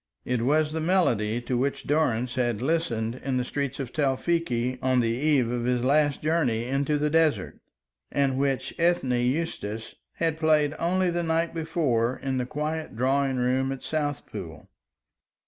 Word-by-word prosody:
It 125 -2 0
was 150 +5 +2
the 160 - -2
melody 120 - +2
to 120 +1 -2
which 140 +2 -1
Durrance 125 -5 +1
had 120 -4 0
listened 125 -5 -1
in 135 -1 -1
the 125 - 0
street 140 +1 -3
of 130 -3 -5
Tewfikieh 135 -3 0
on 130 -1 +2
the 115 -2 +2
eve 130 -1 +2
of 120 -1 -2
his 125 -1 +1
last 145 +2 +2
journey 150 -8 +1
into 140 +3 0
the 150 0 0
desert; 155 -11 +1 0.5
and 140 -2 +1
which 135 -1 -1
Ethne 170 -6 +2
Eustace 120 -4 -2 0.2
had 160 -1 -1
played 155 -2 +3
only 180 +1 +1
the 175 0 -1
night 165 0 0
before 145 -8 0
in 130 -1 -2
the 125 - -2
quiet 155 0 -3
drawing 135 +2 +1
room 130 +2 +1
at 135 - -6
Southpool. 145 -2 -4
135 Hz, 160 wpm, -26 LUFS, 125-155 Hz, 0.5 s, played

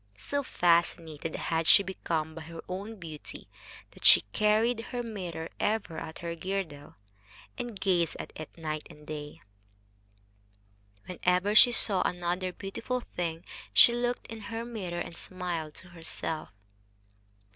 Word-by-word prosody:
So 285 - -1
fascinated 170 - +1
had 165 -1 0
she 200 - +8
become 165 -4 -2
by 165 - -7
her 165 +1 -8
own 200 +5 -5
beauty 160 -6 -8 0.4
that - - -16
she - - +9
carried 220 +3 +3
her 245 -1 -3
mirror 180 -8 -5
ever 205 -6 0
at 160 - -7
her 170 - -1
girdle, 170 -4 -4 0.6
and 235 -5 -5
gazed 180 -4 +2
at - - -6
it 155 - -7
night 155 -2 -4
and 150 0 -14
day. 150 -1 -7 1.6
Whenever 180 +2 +1
she 245 +3 +9
saw 200 -5 +3
another 180 +1 -1
beautiful 225 +7 -3
thing 170 -5 -4 0.3
she 235 - +9
looked 245 0 -1
in 225 0 -7
her 225 +2 -4
mirror 190 -8 -4
and 170 - -5
smiled 170 -4 -3
to 180 - -8
herself. 165 -2 -4
180 Hz, 135 wpm, -30 LUFS, 160-210 Hz, 1.6 s, she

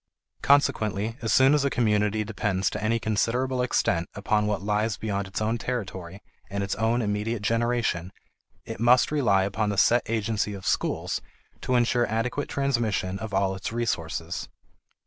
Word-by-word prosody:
Consequently 110 -6 +2
as 115 - -1
soon 135 +2 +6
as 150 -2 +3
a 140 - +2
community 105 -3 +1
depends 100 -3 -1
to 105 - -4
any 115 +2 +2
considerable 120 +4 0
extent 85 -8 0
upon 105 +1 +1
what 105 -2 -1
lies 105 +1 0
beyond 100 -2 -2
its 95 - -4
own 110 +2 0
territory 95 -7 -5 0.3
and 100 0 -2
its 100 - -2
own 115 +2 +1
immediate 105 +1 -2
generation, 115 -6 0 0.5
it - - -7
must 120 +3 +4
rely 105 -11 +3
upon 100 +2 -1
the 100 - -2
set 120 +5 +5
agency 105 -2 -1
of 95 - -10
schools - - -1 0.4
to 130 - 0
insure 120 0 +2
adequate 120 +6 -2
transmission 115 -9 -1
of 110 +1 -6
all 95 0 +1
its 95 - -5
resources. 85 -7 -3
110 Hz, 160 wpm, -26 LUFS, 100-120 Hz, 0.5 s, soon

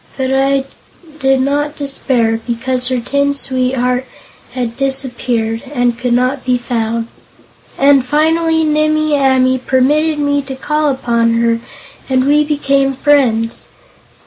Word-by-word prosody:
But 265 -1 -1
I 270 0 +2 0.6
did 270 -2 +2
not 290 +2 -1
despair, 255 -5 0
because 250 +1 -1
her 255 -1 0
tin 280 +4 0
sweetheart 255 -1 -1 0.5
had 245 -3 -3
disappeared, 245 -4 0
and 245 -1 +1
could 240 +1 -2
not 255 +2 0
be 250 -1 +1
found. 230 -1 -3 0.7
And 275 -1 +4
finally 320 +4 +1
Nimmie 310 0 +1
Amee 260 -2 +2
permitted 295 +5 +1
me 285 -1 0
to 265 -1 -7
call 300 +3 -1
upon 235 -3 0
her 230 0 +1 0.5
and 260 0 +2
we 295 +2 +3
became 275 -2 0
friends. 255 -5 +1
265 Hz, 125 wpm, -14 LUFS, 245-285 Hz, 0.7 s, And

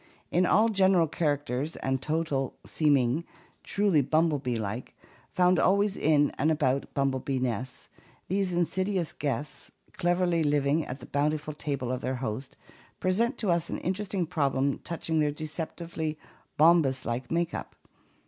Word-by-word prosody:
In 180 +1 +3
all 225 +2 +4
general 190 -4 +4
characters 145 -2 -1
and 130 -1 -1
total 150 -3 -1
seeming 145 -1 +2 0.4
truly 200 -7 +2
bumblebee 145 -4 +1
like, 110 +3 -5 0.3
found 180 -1 +3
always 200 +1 +3
in 145 -1 +3
and 150 +4 +3
about 140 -4 +1
bumblebee 135 -1 0
nests, 125 0 -3 0.4
these 190 0 0
in 175 0 +2
sidious 185 -1 -1
guests, 145 0 -4 0.2
cleverly 175 -2 +1
living 145 +1 +2
at 130 +2 -6
the - - -9
bountiful 150 +1 -1
table 140 -4 -3
of 130 0 -2
their 130 +1 -2
host, 125 +1 -5 0.4
present 225 +8 +1
to 205 -5 0
us 170 -1 0
an - - -2
interesting 190 0 -2
problem 140 -4 0
touching 165 -1 -2
their 150 -1 +3
deceptively 155 +1 -4 0.4
Bombus 155 -4 +4
Uke 120 +1 -3
makeup. 170 0 -2
155 Hz, 140 wpm, -28 LUFS, 135-175 Hz, 0.4 s, all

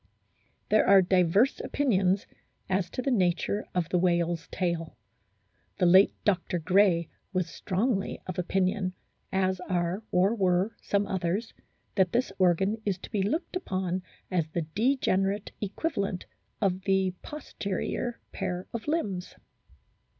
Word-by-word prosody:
There 215 - +4
are 195 -1 +7
diverse 185 +7 +3
opinions 195 -8 +1 0.4
as 185 -2 0
to 255 - -4
the 275 - +1
nature 190 -1 +1
of 175 -3 0
the 180 - +2
whale's 170 -2 +1
tail. 170 -6 -2 0.8
The 185 - +2
late 185 +3 +6
Dr. 185 -3 +1
Gray 175 0 +3 0.3
was 185 -2 0
strongly 195 +4 -1
of 185 0 -4
opinion, 185 +1 0 0.4
as 190 -1 +1
are 180 +1 -1
or 190 +4 +3
were 190 0 +1
some 200 0 +1
others, 190 +4 -2 0.4
that 185 -3 +2
this 245 -3 +1
organ 190 +4 +2
is 200 -4 0
to - - -11
be 210 -3 0
looked 315 - -1
upon 185 - -2 0.3
as 170 -4 +1
the 165 +1 -2
degenerate 205 -4 +1
equivalent 200 - -2 0.4
of 190 -2 +1
the 190 -1 +2
posterior 240 -4 -4
pair 180 0 -3
of 235 +2 -5
limbs. 205 - -2
190 Hz, 130 wpm, -28 LUFS, 180-205 Hz, 0.8 s, are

